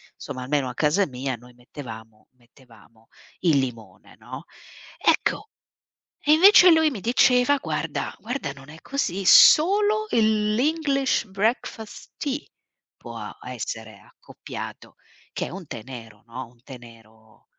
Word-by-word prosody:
Insomma 130 -3 -8
almeno 140 0 -1
a 125 - -7
casa 160 +8 +1
mia 130 0 -4
noi 125 +1 -17
mettevamo 115 -4 -12
mettevamo 115 -2 -23 0.3
il 165 -5 +2
limone, 115 -7 -7
no, - - -10 0.5
ecco, - - 0 0.7
e 300 - +2
invece 365 +3 +8
lui 320 -2 +4
mi 240 -8 -7
diceva, 250 +5 +3
guarda - - -4
guarda, 235 - -4
non 135 0 -15
è 160 +2 -13
così, 195 -9 -3
solo 415 - +6
il 215 - +2
l' 220 - -1
English 280 -3 0
Breakfast 215 +2 -3
Tea 285 0 -3 0.6
può - - -10 0.3
essere - - -7
accoppiato, - - -11 0.4
che - - -3
è - - -7
un 190 -3 -9
tè 120 -5 -8
nero, 115 -5 -11
no, 125 +2 -8
un 120 0 -26
tè 135 0 -11
nero 110 -2 -19
150 Hz, 135 wpm, -24 LUFS, -, 0.7 s, invece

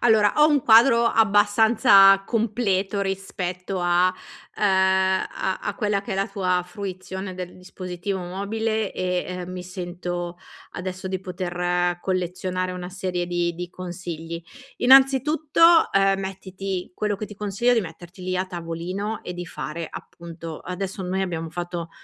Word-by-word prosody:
Allora, 220 -3 +4
ho 300 +1 +7
un 290 -2 +3
quadro 235 +1 +6
abbastanza 205 -2 +5
completo 210 -4 0
rispetto 190 -1 -3
a 175 +1 +3 0.5
uhm, - - -5
a 190 -1 +2
a 205 - -2
quella 205 -2 0
che 205 - -10
è - - -1
la 195 - +1
tua 180 -2 0
fruizione 190 0 -6
del 180 -1 -7
dispositivo 185 +1 -5
mobile 210 +4 -2
e, 180 -1 -1
ehm, 180 0 -6
mi 185 -1 -6
sento 175 -1 -5 0.3
adesso 185 +1 -5
di 190 -1 -3
poter 175 -1 -1
collezionare 185 0 -2
una 180 -1 -6
serie 180 -1 -3
di 175 -1 -1
di 175 +1 -6
consigli. 170 -2 -6 0.4
Innanzitutto, 290 +5 +5
uhm, 195 0 +3
mettiti 190 -1 -5
quello 210 +2 -1
che 215 - -5
ti 210 - -11
consiglio 210 +4 0
è 245 - +5
di 225 - +3
metterti 175 +1 -10
lì 185 0 -2
a 185 - 0
tavolino 180 +4 -4
e 180 - -6
di 175 0 -6
fare, 165 0 -5
appunto 165 -1 -9
adesso 190 +2 -5
noi 185 +1 -1
abbiamo 165 -3 -3
fatto 175 0 -5
185 Hz, 145 wpm, -24 LUFS, 180-205 Hz, 0.5 s, ho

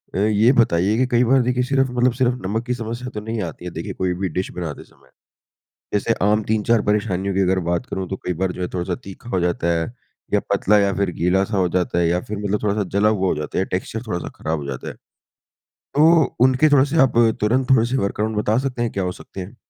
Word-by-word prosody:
अ, - - -1
ये 110 +4 +4
बताइए 100 +1 +1
की 130 - +3
कई 120 - +5
बार 130 +2 +4
देखिए 125 +1 0
सिर्फ़ 135 -1 +1
मतलब 125 0 +2
सिर्फ़ 125 0 +3
नमक 110 +4 -2
की 125 - -1
समस्या 120 +1 -5
तो 105 - -4
नहीं 110 0 -4
आती 90 - -12
है 90 - -5
देखिए 90 +5 -5
कोई 90 -1 -1
भी 95 - 0
डिश 95 - -3
बनाते 85 -5 -6
समय। - - -25 0.9
जैसे 105 +3 +1
आम 105 +2 +3
3-4 110 +1 +1
परेशानियों 100 -2 0
की 95 - +1
अगर 95 0 +2
बात 85 +9 -1
करूँ, 95 -7 -4
तो 95 - -3
कई 90 - -4
बार 90 +2 -1
जो - - -9
है 90 - -2
थोड़ा-सा 90 0 -2
तीखा 100 +5 -11
हो 90 - 0
जाता 85 -1 -1
है 80 - -1 0.5
या 100 - +4
पतला 105 +1 +3
या 100 -1 +2
फिर 100 0 0
गीला-सा 95 +4 +1
हो 90 -1 +2
जाता 90 -1 0
है 85 - +2
या 90 +1 +1
फिर 105 +2 -6
मतलब 105 +1 -2
थोड़ा-सा 105 0 0
जला 105 +1 +4
हुआ 95 -3 +1
हो - - +1
जाता 75 +3 -4
है - - +3
या - - 0
टेक्सचर 110 +5 -5
थोड़ा-सा 90 -4 -3
ख़राब 80 0 -2
हो 70 - -6
जाता 65 -2 -5
है। - - -7 0.8
तो 160 +1 +2
उनके 130 +4 +4
थोड़े 140 -2 +5
से 150 +3 -2
आप 130 - +3 0.3
तुरंत 125 +5 +1
थोड़े 125 -4 +5
से 130 - -1
वर्क 100 -4 -2
अराउंड 110 0 -1
बता 105 +1 +1
सकते 130 -3 -3
हैं 120 - 0
क्या 95 - -2
हो 90 - -1
सकते 95 - -11
हैं? 95 +7 -9
105 Hz, 250 wpm, -21 LUFS, 95-120 Hz, 0.9 s, कई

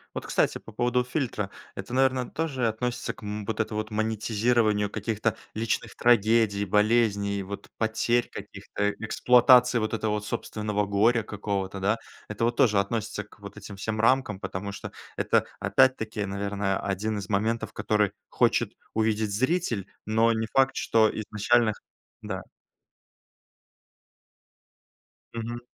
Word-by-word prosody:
Вот, - - -4
кстати, - - +1
по - - -13
поводу 120 +3 +1
фильтра. 125 -6 -2 0.3
Это, 100 +5 -7
наверно, 130 -1 +2
тоже 140 -6 -1
относится 120 +3 -2
к, - - -16
м, 105 0 -4
вот 110 - -3
это 110 - -1
вот 110 0 -3
монетизированию 110 0 +1
каких-то 110 +1 -1 0.2
личных 110 +1 -2
трагедий, 110 -3 +3
болезней, 105 -1 +2
вот 100 +1 -8
потерь 115 +2 +1
каких-то, 100 0 -6
э 105 0 +1
эксплуатации 125 +2 +5
вот 110 0 -2
этого 105 -1 -1
собственного 105 0 -2
горя 110 +4 +3
какого-то, 100 -2 -3
да. 100 +4 +1 0.3
Это 105 +2 -4
вот 120 0 0
тоже 105 -5 +4
относится 105 +1 -2
к 105 - -20
вот 100 0 -10
этим 100 -1 -9
всем 110 +2 -3
рамкам, 115 -3 +2
потому 95 +1 -5
что 100 - -8 0.3
это - - +2
опять-таки, 110 -5 +2
наверное, 100 0 -2
один 105 +2 -2
из 100 -2 -5
моментов, 110 +3 0
который 105 -2 +1 0.2
хочет - - +2 0.2
увидеть 110 -1 +1
зритель, 125 - 0 0.2
но 110 +2 +3
не 110 0 0
факт, 135 0 +3
что 110 -1 +3
изначально 110 +2 +2
х - - -17 0.4
да. - - -5 2.9
Мгм. 115 +1 -4
110 Hz, 140 wpm, -27 LUFS, 100-115 Hz, 2.9 s, эксплуатации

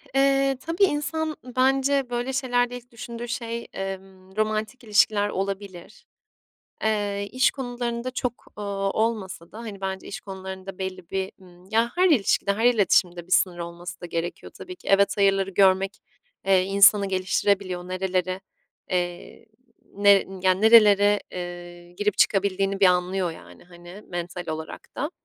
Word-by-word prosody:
Eee, 275 0 +3
tabii 330 +4 +1
insan 310 -2 0
bence 265 +1 +1
böyle 245 +2 -2
şeylerde 245 -2 0
ilk 245 +1 -16
düşündüğü 235 +1 -7
şey, 235 -1 -4
emm, 190 0 -7
romantik 215 +3 -2
ilişkiler 205 -1 +3
olabilir. 195 -1 -5 0.8
Eee, 205 -2 0
iş 255 +2 +3
konularında 245 -1 -4
çok, 250 -1 -4
ııı, 210 - -5 0.3
olmasa 205 -6 -2
da, - - -11
hani, 215 -4 -8
bence 190 0 -4
iş - - -7
konularında 190 -1 -8
belli 185 -2 -6
bir, 190 0 -2
ımm, 180 -1 -18
ya 230 +2 +2
her 365 +1 +4
ilişkide, 205 - +2
her 225 +3 -1
iletişimde 185 -7 +3
bir - - -17
sınır 175 0 +3
olması 175 +1 -7
da - - -6
gerekiyor 170 0 -5
tabii 365 0 -9
ki. - - -18
Evet, 200 +1 +3
hayırları 195 -1 +3
görmek, 195 0 +3 0.5
eee, 190 -1 +4
insanı 200 +1 +5
geliştirebiliyor. 185 -1 0
Nerelere, 185 0 -2 0.5
eee, 175 +2 -3 0.5
ne 200 0 +4 0.3
ya 185 - +5
nerelere, 205 0 +6
eee, 175 -1 -8
girip 205 +2 -1
çıkabildiğini 195 0 +2
bir 200 - +6
anlıyor, 180 0 +2
yani, 90 - -14
hani, 175 +3 -13
mental 175 0 -5
olarak 160 0 -5 0.2
da. 290 +5 -2
195 Hz, 145 wpm, -25 LUFS, 185-235 Hz, 0.8 s, nerelere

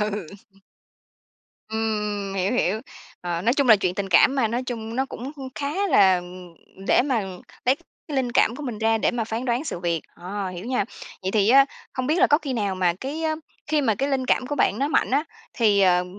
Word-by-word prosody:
Ừ. 210 -3 -2 1.4
Ừm, 220 0 -1 0.3
ừm, 195 - -6
hiểu, 190 +1 0
hiểu. 215 -3 +1 0.4
Ờ, 175 -1 -3
nói 235 - +3
chung 280 -2 +1
là 220 - +9
chuyện 185 -2 -1
tình 195 0 -3
cảm 260 +8 +5
mà, 250 -5 +2
nói 240 +3 -1
chung 230 -2 -5
nó 265 +1 +1
cũng 265 +2 -7 0.2
khá 300 +8 -1
là, 195 - +5
ừm 180 -1 -9 0.3
để - - +4
mà 255 -5 0 0.4
lấy 255 +2 +4 0.3
cái 295 - -3
linh 250 -2 0
cảm 235 +1 +3
của 300 - -7
mình 245 -7 -4
ra 225 0 +2
để - - +2
mà 235 -2 -2
phán 225 +3 -4
đoán 245 +3 0
sự 180 - -4
việc. 170 -2 0
Ờ, 190 +2 -5
hiểu 180 +1 -7
nha. 245 -4 0 0.4
Vậy 190 - -1
thì 205 0 +2
á, 275 +3 +7 0.3
hông 255 -1 -2
biết 310 +4 +1
là - - +6
có 295 - +4
khi 290 -5 -4
nào 205 -5 -1
mà 180 -2 +2
cái 290 +5 -4 0.4
khi 300 0 +2
mà 230 -6 +2
cái 270 +7 -1
linh 265 -2 0
cảm 255 - +2
của 290 - -2
bạn - - +2
nó 280 +2 +1
mạnh 310 - +1
á, 285 +4 +2 0.3
thì, 210 -4 +3
ờ, 180 -2 +4
225 Hz, 225 wpm, -24 LUFS, 195-265 Hz, 1.4 s, là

